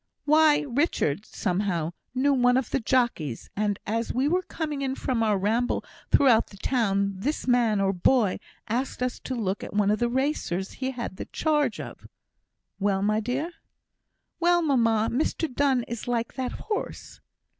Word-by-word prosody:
"Why, 305 0 +5
Richard, 240 - 0
somehow, 180 -4 -1 0.2
knew 280 +2 +3
one 250 -1 +4
of 260 -3 -2
the - - +1
jockeys, 225 - 0
and, 205 -1 0
as 225 +2 -1
we 260 +3 +1
were 360 +4 +2
coming 305 -5 -4
in 265 -1 -1
from 250 -4 -1
our 215 -2 +2
ramble 225 +6 0 0.2
through 285 - +4 0.2
the 200 - -14
town, 200 -6 +1
this 285 +11 -2
man, 235 -4 +3
or 195 0 +2
boy, 205 +2 +2 0.3
asked 250 +3 -2
us 250 - -2
to 260 - -5
look 200 -4 -2
at - - -7
one 205 -1 +3
of 210 - +1
the 240 - +1
racers 245 - -1
he 260 0 -3
had 240 -7 -5
the - - -5
charge 295 -7 0
of." - - -9 0.7
"Well, 195 -1 +1
my 215 +1 +2
dear!" 260 +10 -2 0.9
"Well, 345 0 +3
mamma! 230 -7 +2
Mr 310 +5 0
Donne 265 -2 +2
is 235 0 -6
like 235 -1 -1
that 260 -2 -3
horse!" 425 -2 -5
240 Hz, 165 wpm, -26 LUFS, 205-275 Hz, 0.9 s, Why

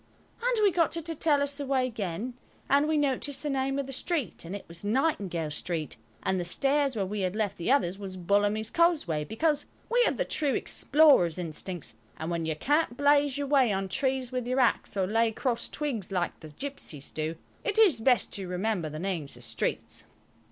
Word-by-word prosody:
And - - +2
we 405 - +6
got 335 -2 +2
her 335 - -2
to 330 +1 -4
tell 295 -2 +2
us 285 0 -2
the 285 - -3
way 260 -1 +2
again, 220 0 -4 0.3
and 285 +2 +4
we 310 0 +2
noticed 285 0 -1
the 295 - -1
name 270 0 0
of 280 - -1
the 270 - -6
street, 295 0 -2
and 170 +4 -6
it 200 - -7
was 170 +2 -8
Nightingale 205 - 0
Street, 155 0 -2 0.3
and 190 - +1
the - - -1
stairs 275 +8 +1
where 200 -3 0
we 205 +2 -4
had 185 +1 -1
left 210 -2 -1
the 175 +8 0
others 195 -9 +2
was 190 -2 -6
Bullamy's 205 +4 +1
Causeway, 310 - +2
because 295 - 0 0.2
we 485 +1 +4
have - - 0
the - - 0
true 285 -3 0
explorer's 280 - +4
instincts, 175 0 -4 0.2
and 160 +2 -4
when 165 -1 -1
you 160 - 0
can't 290 - +1
blaze 285 -1 +4
your 285 - -1
way 270 -5 +4
on 195 0 -1
trees 260 +4 -1
with 250 -2 -2
your 255 +2 +1
axe, 240 -4 +1
or 190 - +2
lay 225 +3 +2
crossed 235 +1 -2
twigs 250 - -3
like 180 -2 -1
the 155 - -10
gipsies 160 - -7
do, 155 +1 -3 0.3
it 430 -3 -1
is 390 - +5
best 250 0 +3
to 195 -2 -5
remember 180 -2 -1
the 155 - -7
names 165 -7 -3
of 120 - -10
streets. 115 -1 -3
230 Hz, 210 wpm, -28 LUFS, 180-285 Hz, 0.3 s, we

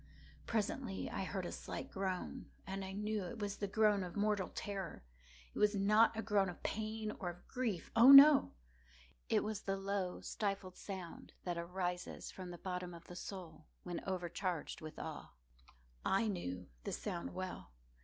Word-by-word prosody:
Presently 220 -1 -1
I - - -2
heard 190 -1 -3
a - - -4
slight - - -6
groan, 190 -2 -3 0.2
and 195 0 -4
I 190 - -5
knew 210 +2 -1
it 185 +6 -6
was 205 -2 -3
the 200 - -2
groan 210 0 +4
of 180 - -6
mortal 205 -2 +1
terror. 195 - -5 0.5
It - - -5
was 210 0 +4
not 215 +3 +5
a 225 - -1
groan 200 -3 +3
of 175 - -9
pain 215 0 -2
or 180 - -2
of 175 0 -10
grief—oh, 235 +1 +4
no!—it 60 - +5
was 215 -1 -3
the 195 0 -1
low 195 -2 -2
stifled 195 -3 -2
sound 190 -4 -7
that 175 -2 -2
arises 180 +1 -3
from 185 -1 -7
the 175 - -7
bottom 180 -1 -4
of 170 - -12
the 175 - -10
soul 180 -4 -8 0.2
when 175 -1 -4
overcharged 180 -2 -2
with 155 0 -8
awe. - - -6 0.7
I 210 +4 +2
knew 90 - -3 0.2
the - - -3
sound 175 0 -4
well. 185 - -5
190 Hz, 165 wpm, -37 LUFS, 175-210 Hz, 0.7 s, not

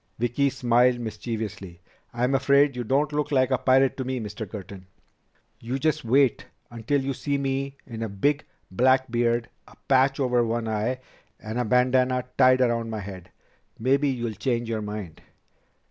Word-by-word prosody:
Vicki 120 +4 +1
smiled 125 0 +2
mischievously. 110 -5 -5 0.3
"I'm 125 +3 0
afraid 140 +1 +3
you 125 - -3
don't 140 +5 0
look 150 0 -1
like 130 -1 +2
a 130 - +3
pirate 135 0 +3
to 130 - -2
me, 130 0 -3
Mr. 105 -1 -6
Curtin." 95 -2 -9 0.7
"You 125 +3 -3
just 155 +2 0
wait 130 +1 +2 0.2
until 120 +5 -1
you 135 +1 -2
see 140 +2 -2
me 135 0 -2
in 115 -3 -8
a 115 - -2
big, 145 +10 0 0.3
black 130 +4 +2
beard, 120 0 +1 0.2
a - - -17
patch 135 +1 +3
over 125 -3 +2
one 115 0 -2
eye, 110 +4 -2 0.4
and 110 +2 -5
a 125 - 0
bandanna 125 +2 +2
tied 130 -1 +5
around 115 -2 +1
my 110 -1 -4
head. 95 -3 -9 0.5
Maybe 135 +4 +2
you'll 120 -4 -2
change 115 +4 -2
your 110 -1 -2
mind." 105 -6 -7
125 Hz, 165 wpm, -25 LUFS, 110-135 Hz, 0.7 s, tied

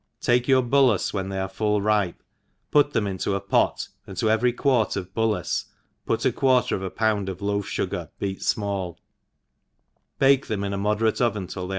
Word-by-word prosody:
TAKE 120 0 +2
your 130 -2 +4
bullacc 125 -6 +3
when 95 -1 -2
they 95 - -4
arc 95 0 -3
full 105 -1 +1
ripe^ 105 -3 +1 0.6
put 145 -1 +4
rhem 115 -3 +2
into 95 0 -2
a - - 0
pot, - - +1 0.2
and 95 -2 -9
to 110 +2 +2
every 115 +3 +3
quart 125 -3 +1
of 95 -1 -5
bal 110 0 +1
lace 105 - -2 0.4
put - - 0
a - - +4
quarter 130 -2 +2
of - - -4
a 95 - -3
pound 105 -1 0
of 95 -1 -6
loaf 100 0 -1
ftigar - - -3
beat 95 -1 -3
fmall, 100 -4 -2 1.2
bake 135 0 +4
them 100 -2 -2
in 100 0 -2
a - - -2
moderate 105 +3 +1
oven 105 -5 0
till 90 0 -6
they - - -9
105 Hz, 200 wpm, -24 LUFS, 95-120 Hz, 1.2 s, your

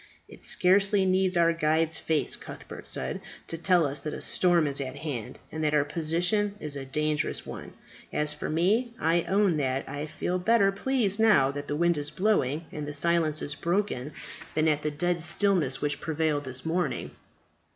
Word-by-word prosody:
"It - - -14
scarcely 195 +2 +4
needs 185 -1 +2
our 170 0 +4
guide's 160 0 +1
face," 160 -2 0
Cuthbert - - -10
said, - - -3 0.2
"to - - -4
tell 175 0 +3
us 140 0 -1
that 150 - -4
a - - -7
storm 175 -3 +3
is 140 -1 0
at 130 0 -5
hand, 140 -7 -5
and 155 0 -4
that 150 0 +2
our 150 - +4
position 175 +7 0
is 150 -5 -3
a 135 -1 -5
dangerous 150 +2 -1
one. - - -8 0.4
As 150 0 0
for 150 - -5
me, 215 +10 +1
I 165 +2 +2
own 195 -4 +2
that 135 -2 -1
I 145 +2 -5
feel 175 +4 -2
better 200 +1 +3
pleased 210 -1 0
now 205 -12 +5
that 145 0 -6
the 145 - -2
wind 170 0 +2
is 145 0 -3
blowing, 165 -7 0
and 150 -1 -5
the 145 - -5
silence 160 0 +2
is 145 - -3
broken, 170 -6 -1 0.4
than 155 0 +2
at 150 -1 +2
the 150 - -1
dead 170 +3 -1
stillness 170 -6 +2
which 145 0 -2
prevailed 155 -2 -1
this 130 +1 -5
morning. 175 +2 -1
160 Hz, 185 wpm, -27 LUFS, 145-185 Hz, 0.4 s, now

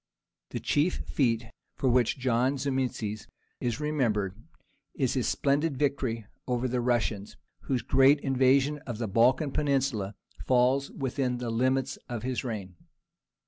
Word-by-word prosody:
The 120 - -4
chief 145 +8 +1
feat 115 -4 +1 0.3
for 135 - -1
which 125 0 +3
John 130 +1 +1
Zimisces 125 -6 -2 0.3
is 120 +1 -2
remembered 120 -11 0 0.6
is 130 -5 0
his 130 -3 0
splendid 145 +1 +1
victory 130 -6 -1 0.2
over 125 0 0
the 125 0 -1
Russians, 115 -4 -1 0.3
whose 130 -3 -1
great 135 +2 +5
invasion 135 +2 +3
of 120 -3 -4
the 115 -1 -2
Balkan 125 - +3
Peninsula 135 -9 0 0.3
falls 130 +2 +3
within 130 -2 -2
the 120 -1 -3
limits 130 +3 +1
of 120 -2 -4
his 130 0 -2
reign. 100 -7 -5
130 Hz, 135 wpm, -28 LUFS, 115-135 Hz, 0.6 s, great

